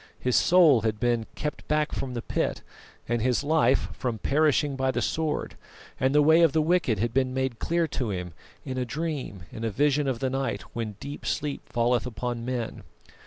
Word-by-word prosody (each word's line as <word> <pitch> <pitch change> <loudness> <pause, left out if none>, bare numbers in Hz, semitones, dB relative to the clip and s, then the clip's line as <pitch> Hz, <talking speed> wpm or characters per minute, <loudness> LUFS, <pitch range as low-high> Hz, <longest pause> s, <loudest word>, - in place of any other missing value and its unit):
His 125 -1 0
soul 165 -9 +6
had 110 -1 -1
been 120 -2 +1
"kept 150 - -5
back 150 0 +1
from 130 -2 -4
the 120 - -4
pit," - - -2 0.4
and 120 -1 0
his 125 +3 +1
life 145 -4 +2
from 120 -4 -3
"perishing 145 +3 +2
by 130 0 0
the 130 - 0
sword;" 155 -2 -2 0.4
and 130 +2 +2
the 150 - +6
way 160 +3 +6
of 165 -4 +5
the 160 - +3
wicked 165 -9 +2
had 115 +3 -1
been 130 -1 +1
made 130 -3 -1
clear 170 0 +1
to 125 -5 -2
him 90 -3 -4 0.3
"in 130 -2 -3
a - - 0
dream, 145 - -4
in 110 - -7
a 115 - 0
vision 145 +5 +2
of 130 -3 0
the 130 +2 -1
night 130 -6 -2
when 115 -3 -4
deep 145 +1 -7
sleep 145 -1 -2
falleth 120 0 +1
upon 120 +1 -4
men." 120 -2 -3
130 Hz, 200 wpm, -27 LUFS, 115-150 Hz, 0.4 s, soul